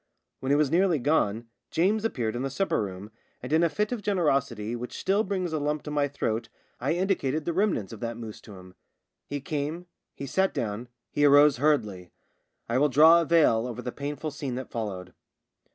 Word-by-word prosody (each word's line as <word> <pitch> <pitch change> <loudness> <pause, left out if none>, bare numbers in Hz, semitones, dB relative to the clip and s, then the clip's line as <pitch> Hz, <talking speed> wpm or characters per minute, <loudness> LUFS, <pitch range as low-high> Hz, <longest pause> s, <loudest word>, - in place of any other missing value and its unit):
When 130 - -2
it - - +5
was 145 -1 +2
nearly 175 -1 +3
gone 120 -6 +1 0.2
James 205 +6 +1
appeared 120 - -1
in 120 - -3
the 135 - -2
supper 165 - 0
room, 100 +1 -6 0.3
and 125 +4 -4
in 160 - +4
a 170 - +3
fit 210 +6 -1
of 245 -3 -3
generosity 140 - 0
which 125 +1 -6
still 200 +3 +1
brings 185 -4 -2
a 155 - 0
lump 150 +1 -2
to 150 - -6
my 145 -1 +1
throat 115 -5 -3 0.3
I 135 +6 0
indicated 165 -5 0
the 170 - -1
remnants 175 - 0
of 110 - -9
that 115 -1 -4
mousse 115 -2 -8
to 105 - -12
him. 90 0 -13 0.5
He 145 - -3
came 150 +5 -3 0.2
— - - -59
he 140 - -6
sat 190 +8 0
down 110 +2 -3
— - - -58
he 145 - 0
arose 145 -1 +6
hurriedly. 105 - 0 0.6
I 120 +2 +1
will 145 +1 +3
draw 160 +5 +7
a - - -1
veil 150 -9 +3
over 125 0 -6
the 125 - -3
pain 145 +3 -4
ful 155 +2 -5
scene 140 -3 -4
that 130 0 -6
followed. 95 -6 -5
145 Hz, 215 wpm, -27 LUFS, 115-165 Hz, 0.6 s, draw